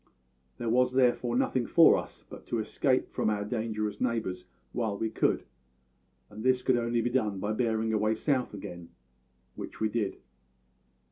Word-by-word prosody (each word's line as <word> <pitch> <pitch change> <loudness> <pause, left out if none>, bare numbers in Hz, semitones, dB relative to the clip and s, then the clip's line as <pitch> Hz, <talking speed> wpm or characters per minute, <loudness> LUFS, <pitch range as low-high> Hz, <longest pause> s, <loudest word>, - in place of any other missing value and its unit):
There 120 - -4
was 125 +2 +3
therefore 125 -2 +2
nothing 125 -1 +1
for 165 -1 +7
us - - -6
but - - -12
to - - -1
escape - - 0
from - - 0
our 105 -1 -1
dangerous 110 -1 -3
neighbours 110 -7 -1 0.3
while 110 -4 -2
we 110 +1 -2
could, - - +1 0.8
and 110 +8 -9
this 130 0 +2
could 130 - +3
only 120 0 +1
be 120 - -1
done 110 -6 0
by 105 +2 -1
bearing 110 -1 0
away 110 +1 +2
south 130 +1 0
again, 85 -3 -8 0.6
which - - -8
we 110 - +1
did. 105 -3 -2
115 Hz, 160 wpm, -29 LUFS, 105-125 Hz, 0.8 s, for